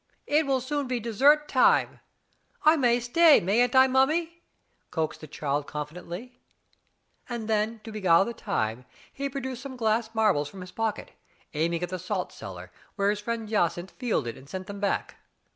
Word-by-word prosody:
"It 300 Hz, 0 st, +2 dB
will 265 Hz, -2 st, +1 dB
soon 280 Hz, +2 st, -2 dB
be 250 Hz, -1 st, -1 dB
dessert 280 Hz, +7 st, +3 dB
time; 260 Hz, -, +3 dB, 0.6 s
I 310 Hz, +1 st, +6 dB
may 245 Hz, -5 st, +3 dB
stay, 300 Hz, +6 st, +6 dB
mayn't 240 Hz, +8 st, +2 dB
I, 260 Hz, 0 st, +8 dB
mummy?" 315 Hz, +6 st, +1 dB, 0.5 s
coaxed 160 Hz, -2 st, -3 dB
the 155 Hz, -, -9 dB
child 145 Hz, -1 st, -2 dB
confidently. 175 Hz, +11 st, -7 dB, 0.9 s
Then 220 Hz, -1 st, -1 dB
to 225 Hz, -, -8 dB
beguile 190 Hz, -4 st, +4 dB
the 235 Hz, -, -4 dB
time, 125 Hz, -, -2 dB, 0.3 s
he 280 Hz, 0 st, -3 dB
produced 260 Hz, -2 st, -5 dB
some 270 Hz, -2 st, -8 dB
glass 225 Hz, 0 st, 0 dB
marbles 200 Hz, -10 st, +2 dB
from 190 Hz, -, -11 dB
his 180 Hz, 0 st, -9 dB
pocket, 225 Hz, -2 st, -3 dB, 0.4 s
aiming 165 Hz, +3 st, 0 dB
at 175 Hz, -, -2 dB
the 185 Hz, 0 st, -4 dB
salt 185 Hz, +1 st, -3 dB
cellar, 90 Hz, -1 st, -9 dB, 0.2 s
where 200 Hz, 0 st, +2 dB
his 210 Hz, -, -3 dB
friend 225 Hz, +1 st, -4 dB
Jacynth 185 Hz, -3 st, 0 dB
fielded 155 Hz, -, -2 dB
and 135 Hz, +1 st, -16 dB
sent 185 Hz, +1 st, -5 dB
them 200 Hz, +1 st, -8 dB
back. 200 Hz, -, -2 dB
220 Hz, 165 wpm, -27 LUFS, 175-255 Hz, 0.9 s, I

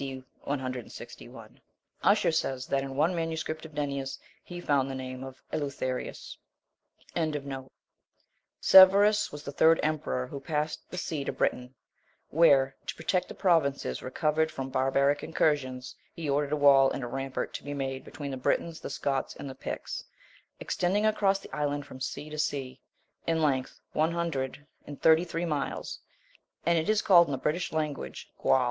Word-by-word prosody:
D. 135 Hz, -1 st, -5 dB, 0.2 s
161." 130 Hz, -3 st, -6 dB, 0.4 s
Usher -, -, +4 dB
says, 135 Hz, -5 st, -1 dB
that 135 Hz, 0 st, 0 dB
in 135 Hz, 0 st, -5 dB
one 155 Hz, +6 st, +2 dB
MS. 165 Hz, -1 st, -2 dB
of 155 Hz, 0 st, -6 dB
Nennius 140 Hz, -2 st, -2 dB, 0.3 s
he 175 Hz, 0 st, -8 dB
found 140 Hz, -5 st, +1 dB
the 135 Hz, -, -4 dB
name 130 Hz, 0 st, -6 dB
of 130 Hz, -1 st, -10 dB
Eleutherius. 140 Hz, -3 st, -3 dB, 0.8 s
23. 140 Hz, -5 st, -2 dB, 0.9 s
Severus 200 Hz, +3 st, +7 dB
was 145 Hz, 0 st, -8 dB
the 140 Hz, -, -5 dB
third 160 Hz, +3 st, +5 dB
emperor 150 Hz, -4 st, -1 dB
who 140 Hz, +2 st, -7 dB
passed 150 Hz, +2 st, -3 dB
the 180 Hz, -, -7 dB
sea 160 Hz, -5 st, -2 dB
to -, -, -1 dB
Britain, 125 Hz, +1 st, -1 dB, 0.6 s
where, 140 Hz, -4 st, +5 dB
to -, -, -3 dB
protect 180 Hz, +3 st, 0 dB
the -, -, -9 dB
provinces 140 Hz, -, +1 dB
recovered 155 Hz, +4 st, 0 dB
from 135 Hz, -3 st, -5 dB
barbaric 140 Hz, +2 st, +2 dB
incursions, 130 Hz, -6 st, 0 dB, 0.2 s
he 165 Hz, -2 st, -6 dB
ordered 145 Hz, +1 st, +1 dB
a -, -, +2 dB
wall 140 Hz, -2 st, +6 dB
and -, -, -4 dB
a -, -, -3 dB
rampart 135 Hz, +2 st, -3 dB
to -, -, -6 dB
be 145 Hz, 0 st, -5 dB
made 135 Hz, -1 st, -3 dB
between 140 Hz, 0 st, -7 dB
the 135 Hz, -, -4 dB
Britons, 160 Hz, +5 st, 0 dB
the -, -, -6 dB
Scots, 135 Hz, -2 st, -2 dB
and -, -, -7 dB
the 135 Hz, -, -6 dB
Picts, -, -, -5 dB, 0.6 s
extending 200 Hz, +4 st, 0 dB
across 205 Hz, -2 st, +3 dB
the -, -, -10 dB
island 145 Hz, -1 st, -1 dB
from 130 Hz, -2 st, -11 dB
sea 145 Hz, -, -4 dB
to 155 Hz, -, -5 dB
sea, 130 Hz, -4 st, -2 dB, 0.5 s
in 165 Hz, -1 st, +2 dB
length 135 Hz, -4 st, 0 dB
one 160 Hz, +2 st, +2 dB
hundred 145 Hz, -5 st, -2 dB, 0.2 s
and 145 Hz, -, -8 dB
thirty 160 Hz, +1 st, +5 dB
three 170 Hz, 0 st, -3 dB
miles: 150 Hz, -4 st, -3 dB, 0.7 s
and 170 Hz, 0 st, +4 dB
it 160 Hz, -, -2 dB
is 215 Hz, -1 st, +3 dB
called 175 Hz, -4 st, +7 dB
in -, -, -4 dB
the 135 Hz, -, -1 dB
British 155 Hz, +7 st, -1 dB
language 155 Hz, -2 st, -4 dB
Gwal. -, -, +4 dB
145 Hz, 165 wpm, -29 LUFS, 135-160 Hz, 0.9 s, Severus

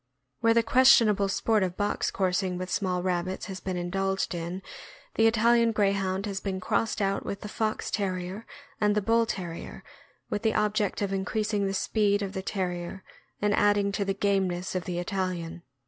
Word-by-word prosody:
Where 230 Hz, 0 st, +3 dB
the 230 Hz, -, +4 dB
questionable 225 Hz, -5 st, +5 dB
sport 215 Hz, +2 st, +1 dB
of 185 Hz, -1 st, -1 dB
box 205 Hz, 0 st, 0 dB
coursing 185 Hz, -1 st, 0 dB
with 185 Hz, 0 st, -5 dB
small 180 Hz, -2 st, 0 dB
rabbits 185 Hz, 0 st, -1 dB
has 190 Hz, -2 st, -6 dB
been 185 Hz, 0 st, -3 dB
indulged 190 Hz, +2 st, -1 dB
in, 175 Hz, +2 st, -5 dB, 0.5 s
the 225 Hz, -, +4 dB
Italian 230 Hz, +1 st, +4 dB
Greyhound 195 Hz, -2 st, +1 dB
has 200 Hz, -2 st, -3 dB
been 190 Hz, -2 st, -3 dB
crossed 215 Hz, +3 st, 0 dB
out 195 Hz, 0 st, 0 dB
with 200 Hz, -, -5 dB
the -, -, -6 dB
Fox 215 Hz, 0 st, -2 dB
Terrier 190 Hz, +1 st, -3 dB, 0.3 s
and 210 Hz, -1 st, +2 dB
the 210 Hz, -, +2 dB
Bull 230 Hz, +2 st, +3 dB
Terrier, 175 Hz, -5 st, -6 dB, 0.4 s
with -, -, -2 dB
the 220 Hz, -1 st, +1 dB
object 210 Hz, -1 st, +1 dB
of 195 Hz, -1 st, -1 dB
increasing 205 Hz, +1 st, -1 dB
the 195 Hz, -, -2 dB
speed 205 Hz, 0 st, +1 dB
of 195 Hz, -1 st, -4 dB
the 190 Hz, -, -3 dB
Ter 190 Hz, -1 st, -2 dB
rier 175 Hz, +2 st, -6 dB, 0.4 s
and 210 Hz, 0 st, +3 dB
adding 205 Hz, -1 st, +3 dB
to 200 Hz, 0 st, -1 dB
the 195 Hz, 0 st, -1 dB
gameness 190 Hz, -3 st, 0 dB
of 185 Hz, -1 st, -2 dB
the 175 Hz, -1 st, -3 dB
Italian. 175 Hz, -2 st, -3 dB
195 Hz, 180 wpm, -27 LUFS, 185-210 Hz, 0.5 s, questionable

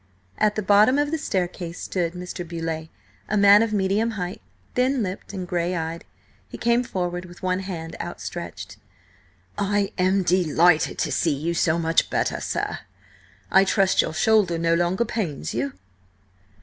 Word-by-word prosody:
At 215 Hz, 0 st, +2 dB
the 215 Hz, -, -2 dB
bottom 210 Hz, +7 st, +5 dB
of 290 Hz, 0 st, +1 dB
the 320 Hz, -, -1 dB
staircase 180 Hz, -, -3 dB
stood 175 Hz, -3 st, -2 dB
Mr. 180 Hz, 0 st, -6 dB
Beauleigh, 165 Hz, -1 st, -4 dB, 0.4 s
a 210 Hz, -, +1 dB
man 200 Hz, +1 st, +7 dB
of 225 Hz, -1 st, 0 dB
medium 205 Hz, +2 st, +1 dB
height, 180 Hz, 0 st, -4 dB, 0.3 s
thin 255 Hz, 0 st, +1 dB
lipped 185 Hz, 0 st, -5 dB
and 185 Hz, -3 st, -5 dB
grey 175 Hz, +1 st, -1 dB
eyed. 165 Hz, 0 st, -4 dB, 0.4 s
He -, -, -8 dB
came 235 Hz, +1 st, +2 dB
forward 180 Hz, -5 st, -3 dB
with 175 Hz, 0 st, -14 dB
one 185 Hz, 0 st, 0 dB
hand 170 Hz, -4 st, -6 dB
outstretched. -, -, -7 dB, 0.8 s
"I 200 Hz, 0 st, 0 dB
am 190 Hz, +1 st, +3 dB
delighted 175 Hz, -2 st, +3 dB
to -, -, -1 dB
see 160 Hz, -4 st, +1 dB
you 160 Hz, +5 st, -2 dB
so 165 Hz, -1 st, +2 dB
much 165 Hz, 0 st, +1 dB
better, -, -, -1 dB
sir. -, -, -2 dB, 0.7 s
I 190 Hz, -, +6 dB
trust 195 Hz, -1 st, +3 dB
your 160 Hz, -, -4 dB
shoulder 205 Hz, -4 st, +3 dB
no 165 Hz, 0 st, +1 dB
longer 175 Hz, +6 st, +1 dB
pains 165 Hz, -, -3 dB
you?" 130 Hz, +4 st, -2 dB
180 Hz, 160 wpm, -24 LUFS, 170-205 Hz, 0.8 s, man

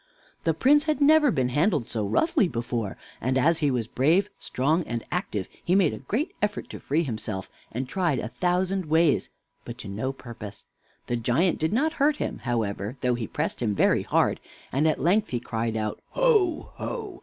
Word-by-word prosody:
The 165 Hz, -2 st, +2 dB
Prince 290 Hz, -, +4 dB
had 310 Hz, -3 st, 0 dB
never 300 Hz, 0 st, +6 dB
been 130 Hz, -, +1 dB
handled 150 Hz, -, +2 dB
so 110 Hz, -2 st, -2 dB
roughly 300 Hz, -, +2 dB
before, 115 Hz, -, -3 dB, 0.2 s
and 130 Hz, +2 st, +1 dB
as 160 Hz, +5 st, +3 dB
he 145 Hz, -, +2 dB
was 125 Hz, -4 st, 0 dB
brave, 160 Hz, -, +2 dB
strong, 150 Hz, +7 st, +1 dB
and 115 Hz, 0 st, -3 dB
active, 110 Hz, -, -2 dB, 0.2 s
he 180 Hz, -, +2 dB
made 190 Hz, -6 st, +4 dB
a -, -, -6 dB
great 225 Hz, -, -2 dB
effort 210 Hz, 0 st, -2 dB
to -, -, -7 dB
free 155 Hz, +4 st, 0 dB
himself, 110 Hz, -, -4 dB, 0.2 s
and 125 Hz, +3 st, -3 dB
tried 170 Hz, -2 st, 0 dB
a 105 Hz, -, -3 dB
thousand 180 Hz, +6 st, 0 dB
ways, 160 Hz, 0 st, +3 dB, 0.3 s
but 120 Hz, 0 st, -8 dB
to 105 Hz, -, -8 dB
no 110 Hz, +7 st, -2 dB
purpose. 115 Hz, -6 st, -10 dB, 0.4 s
The 120 Hz, -, -1 dB
giant 130 Hz, +10 st, +1 dB
did 160 Hz, +2 st, 0 dB
not 300 Hz, +9 st, +1 dB
hurt 295 Hz, +1 st, +4 dB
him, -, -, -3 dB
however, 110 Hz, -1 st, -2 dB
though 125 Hz, -1 st, +2 dB
he 120 Hz, -3 st, -3 dB
pressed -, -, -3 dB
him 105 Hz, -4 st, 0 dB
very -, -, +3 dB
hard, -, -, +1 dB, 0.3 s
and 145 Hz, +4 st, +2 dB
at 155 Hz, -, +1 dB
length 200 Hz, +6 st, +2 dB
he 120 Hz, -, -1 dB
cried 115 Hz, -1 st, -2 dB
out: 110 Hz, -1 st, -3 dB
"Ho, 430 Hz, -10 st, +2 dB
ho! 420 Hz, -7 st, -5 dB
145 Hz, 190 wpm, -26 LUFS, 120-195 Hz, 0.4 s, never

